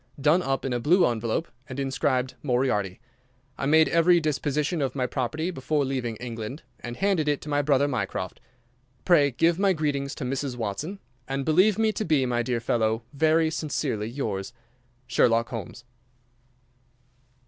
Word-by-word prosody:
done 150 +6 +4
up 135 -5 -1
in 130 - -1
a 120 - 0
blue 175 +9 +4
envelope 115 +7 -1 0.2
and 130 +1 -5
inscribed 130 -1 0
'Moriarty.' 120 -8 0 0.6
I 135 - -2
made 160 +2 +5
every 170 +1 +4
disposition 150 +1 -1
of 135 0 -1
my 130 -2 0
property 150 +7 -2
before 145 -1 -1
leaving 130 -4 -2
England, 115 +4 -6 0.2
and 120 0 -7
handed 190 -6 +1
it 145 -1 +1
to 150 - -8
my 145 0 +2
brother 140 -1 +3
Mycroft. 130 -4 -3 0.6
Pray 150 -6 +5
give 165 +7 +2
my 195 -1 +4
greetings 145 -3 -2
to - - -6
Mrs. 135 0 -2
Watson, 120 - -4 0.3
and 135 0 -2
believe 185 +7 +4
me 220 -1 +3
to 215 - -3
be, 155 -7 +2
my 120 -1 0
dear 120 0 -1
fellow, 115 -1 0
"Very 160 +2 +3
sincerely 140 -9 -2
yours, 110 -7 -4 0.5
"Sherlock 115 -2 +2
Holmes." 115 +1 -7
135 Hz, 160 wpm, -26 LUFS, 120-155 Hz, 0.6 s, made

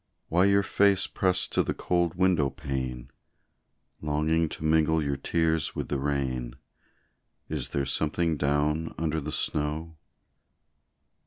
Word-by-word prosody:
Why 90 +3 +4
your 100 0 +4
face 100 0 +3
pressed 95 0 +1
to - - +2
the - - -2
cold 85 -2 0
window 90 -6 +2
pane, 65 -3 -5 0.9
Longing 80 +2 +1
to - - -8
mingle 80 0 +3
your 70 -2 -1
tears 80 +1 0
with - - -4
the 70 - -1
rain 65 -4 -2 0.9
Is - - -3
there 70 -1 -1
something 80 +4 0
down 75 +2 0
under 80 0 -1
the 75 +2 -5
snow? 75 +3 -1
80 Hz, 130 wpm, -27 LUFS, 70-85 Hz, 0.9 s, Why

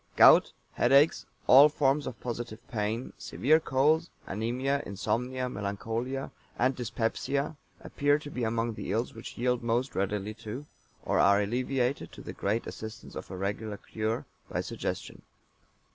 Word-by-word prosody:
Gout, - - +8 0.2
headaches, 140 +5 +4 0.2
all 140 +4 +9
forms 145 0 +1
of 120 -4 -6
positive 120 -1 -4
pain, 110 +2 -2
severe 130 +8 +3
colds, 155 +4 +2 0.2
anæmia, 125 +7 -1
insomnia, 125 +6 -2
melancholia, 115 +5 -3 0.3
and 130 +2 +2
dyspepsia 130 +5 -1 0.3
appear 145 0 +2
to 150 -1 -9
be 125 - -3
among 115 +1 0
the 100 - -5
ills 115 +4 -1
which 115 - -9
yield 125 0 +1
most 120 +3 0
readily 100 +2 -1
to, 115 +5 -7 0.4
or - - +2
are 100 +1 +6
alleviated 125 +4 -1
(to - - -10
the - - -6
great 110 +4 -1
assistance 110 0 -8
of - - -7
a 95 - -6
regular 100 +2 -3
cure), 110 +2 -3 0.2
by - - -2
suggestion. - - -4
120 Hz, 145 wpm, -29 LUFS, 110-135 Hz, 0.4 s, all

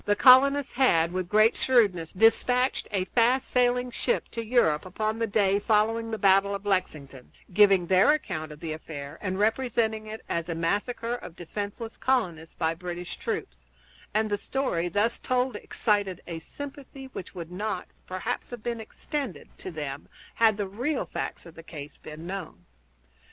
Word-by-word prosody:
The 205 - +3
colonists 275 +4 +6
had, 170 -11 +3
with 185 -1 -2
great 215 +3 +5
shrewdness, 200 -11 +2
dispatched 245 +5 +3
a 195 -3 0
fast 245 +5 +2
sailing 250 0 +2
ship 240 - -1
to 230 - -4
Europe 220 -10 +2
upon 215 +4 -2
the 230 - +1
day 200 -1 +2
following 225 +2 +1
the 220 - -2
battle 195 0 +4
of 200 +1 -7
Lexington, 150 -9 -2 0.2
giving 195 -2 +6
their 185 - +5
account 180 - -2
of 150 - -11
the 160 -2 -3
affair, 145 -3 -8
and 190 -2 -2
representing 220 0 0
it 220 +1 -7
as 170 0 -2
a 165 - -2
massacre 205 +8 -1
of 240 -8 -7
defenseless 205 +6 -6
colonists 175 -12 0
by 160 -1 0
British 175 +1 -6
troops; - - -5 0.4
and 215 +1 +1
the 205 - 0
story 175 -12 -1
thus 210 +6 +1
told 255 -1 0
excited 205 -3 0
a 165 -2 -5
sympathy 275 - -9
which 185 - -8
would 170 -1 -7
not, 195 0 -3 0.2
perhaps, 185 0 -3
have 240 -3 -8
been 235 -1 -3
extended 280 +4 -5
to - - -6
them 145 -4 -6 0.3
had 220 -2 +4
the 205 -2 -2
real 250 +9 -2
facts - - -5
of 170 - -12
the 165 - -11
case 150 -3 -9
been 155 +2 -9
known. 175 - -7
205 Hz, 165 wpm, -27 LUFS, 175-235 Hz, 0.4 s, colonists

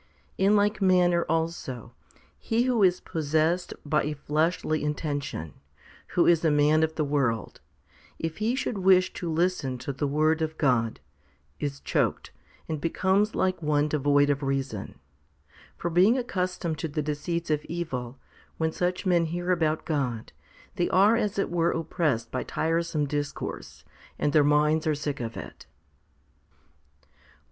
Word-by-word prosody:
1 190 - +2
In 210 - +5
like 210 +1 +2
manner 180 -2 +3
also 160 -7 -3 0.5
he 230 +1 +1
who 250 -3 +1
is 185 -2 +4
possessed 160 +3 0
by 150 0 +2
a 150 +1 -3
fleshly 155 +2 0
intention, 145 - -3 0.6
who 175 - +5
is 170 -1 +4
a 160 - +4
man 150 +1 +4
of 160 0 0
the 155 - 0
world, 135 -6 -1 0.6
if 165 -1 -4
he 225 +4 +1
should 240 -6 -2
wish 185 0 +4
to 175 - -4
listen 160 -6 0
to 140 +3 -5
the 140 +2 -2
Word 155 +3 +2
of 160 0 -2
God, 115 -5 +1 0.6
is 140 -1 -3
choked, - - -1 0.4
and 155 -2 -3
becomes 190 +6 +1
like 185 -2 0
one 150 -1 +2
devoid 145 -1 +3
of 145 +1 -1
reason; 135 -6 -3 0.8
for, 175 - -3
being 190 +9 +5
accustomed 180 -8 -2
to 165 - -2
the 150 0 -3
deceits 155 +3 -3
of 150 -1 0
evil, 135 -7 -4 0.4
when 160 0 0
such 180 +3 -2
men 175 -2 +3
hear 175 +2 -2
about 160 -3 0
God, 125 - -2 0.4
they 175 - +1
are 200 +4 +5
as 210 -4 -1
it 195 - 0
were 170 -1 +2
oppressed 160 -9 -1
by 130 - -2
tiresome 165 -1 -1
discourse, 145 0 -5 0.3
and 145 - 0
their 150 - +6
minds 150 +2 +3
are 155 - +2
sick 145 -1 -4
of 115 -2 -5
it. - - -10
160 Hz, 155 wpm, -27 LUFS, 145-175 Hz, 0.8 s, their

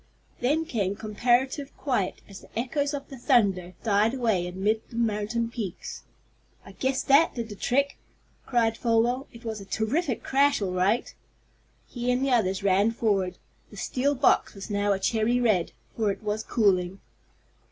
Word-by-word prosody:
Then 300 +6 +1
came 205 - -1
comparative 245 +6 0
quiet, 250 -10 -1
as 200 -1 -10
the - - -13
echoes 285 +4 -1
of 280 -1 -7
the 270 -3 -9
thunder 195 - +2
died 215 +2 +2
away 220 -9 +1
amid 200 +5 0
the - - -11
mountain 230 0 0
peaks. 210 -8 -6 0.6
"I - - -11
guess 265 0 -1
that 280 +4 +4
did 230 -2 -4
the 205 - -7
trick!" 280 +7 0 0.5
cried 230 -3 +2
Folwell. 240 +3 +1
"It 235 0 -14
was 220 -2 -4
a - - -7
terrific 235 - -1
crash 280 +1 +3
all 195 -3 -2
right!" 190 +6 +1 0.7
He 245 0 -3
and 250 +2 +1
the 275 - 0
others 195 -5 +1
ran 200 +2 +4
forward. 200 -6 0 0.3
The 210 - -13
steel 265 +9 0
box 265 -4 +2
was 195 +2 -8
now 205 0 +1
a 195 - +2
cherry 225 +4 +1
red, 215 -8 +2 0.2
for 220 -2 +1
it 195 - -7
was 210 +1 -1
cooling. 195 -5 +1
225 Hz, 165 wpm, -26 LUFS, 200-250 Hz, 0.7 s, that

